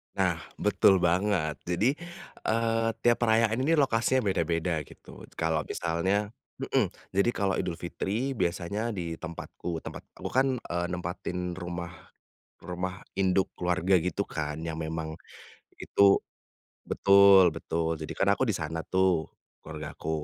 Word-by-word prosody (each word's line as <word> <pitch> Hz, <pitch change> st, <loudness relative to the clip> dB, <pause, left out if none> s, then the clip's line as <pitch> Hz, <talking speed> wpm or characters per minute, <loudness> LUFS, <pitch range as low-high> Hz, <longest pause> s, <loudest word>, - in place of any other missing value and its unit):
Nah, -, -, +1 dB, 0.2 s
betul 95 Hz, -, +4 dB
banget 85 Hz, -4 st, +1 dB
jadi, 100 Hz, +9 st, +2 dB, 0.6 s
eee, 115 Hz, 0 st, +1 dB, 0.2 s
tiap 120 Hz, 0 st, +4 dB
perayaan 115 Hz, 0 st, +3 dB
ini 150 Hz, +5 st, +2 dB
lokasinya 130 Hz, -3 st, +2 dB
beda-beda 85 Hz, -2 st, 0 dB
gitu -, -, -13 dB
kalau 80 Hz, -1 st, 0 dB
misalnya 95 Hz, +5 st, -1 dB, 0.3 s
mhm, -, -, +1 dB, 0.2 s
jadi 100 Hz, +5 st, +3 dB
kalau 95 Hz, -1 st, +1 dB
Idul 90 Hz, -, -2 dB
Fitri 110 Hz, +9 st, -2 dB
biasanya 100 Hz, +1 st, -1 dB
di 85 Hz, -2 st, -3 dB
tempatku, 85 Hz, +1 st, -6 dB
tempat -, -, -7 dB, 0.2 s
aku, -, -, -5 dB
kan, 130 Hz, +1 st, +4 dB
eee, 85 Hz, -6 st, -3 dB
nempatin 90 Hz, 0 st, -4 dB
rumah 85 Hz, -1 st, -5 dB, 0.7 s
rumah 90 Hz, +1 st, -4 dB, 0.2 s
induk 95 Hz, 0 st, +2 dB
keluarga 90 Hz, +1 st, +1 dB
gitu, 90 Hz, +3 st, -1 dB
kan, 75 Hz, -1 st, -4 dB
yang 80 Hz, -1 st, -4 dB
memang 80 Hz, 0 st, -4 dB, 0.7 s
itu -, -, -1 dB, 0.9 s
betul 100 Hz, -1 st, +7 dB
betul 80 Hz, 0 st, -2 dB
jadi, 75 Hz, -, -5 dB
kan, -, -, +1 dB
aku 120 Hz, -, 0 dB
di 105 Hz, -, +1 dB
sana, 80 Hz, -1 st, -3 dB
tuh, 95 Hz, -4 st, +2 dB, 0.3 s
keluargaku. 75 Hz, 0 st, -7 dB
90 Hz, 130 wpm, -28 LUFS, 85-105 Hz, 0.9 s, betul